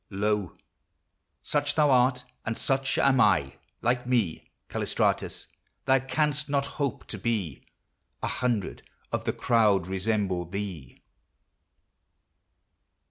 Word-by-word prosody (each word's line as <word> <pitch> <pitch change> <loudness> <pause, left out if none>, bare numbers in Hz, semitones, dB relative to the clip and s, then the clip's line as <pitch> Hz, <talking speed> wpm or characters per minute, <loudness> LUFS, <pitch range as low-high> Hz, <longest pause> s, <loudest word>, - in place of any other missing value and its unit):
Lo! 105 -2 -1 0.9
Such 145 -1 0
thou 150 -3 +4
art, 125 0 +3 0.2
and 115 0 -3
such 135 0 0
am 135 -1 +4
I: 70 - +3 0.3
like 125 +1 +1
me, 115 -10 0 0.2
Callistratus! - - -1 0.4
thou 135 0 +4
canst 150 +2 0
not 140 -1 +1 0.2
hope 140 -4 -1
to 105 - -6
be; 95 - -2 0.6
A - - +1
hundred 120 -6 -1 0.3
of - - -2
the - - 0
crowd 105 -6 +3
resemble 95 -1 -1
thee 90 -7 -6
115 Hz, 110 wpm, -27 LUFS, 95-135 Hz, 0.9 s, thou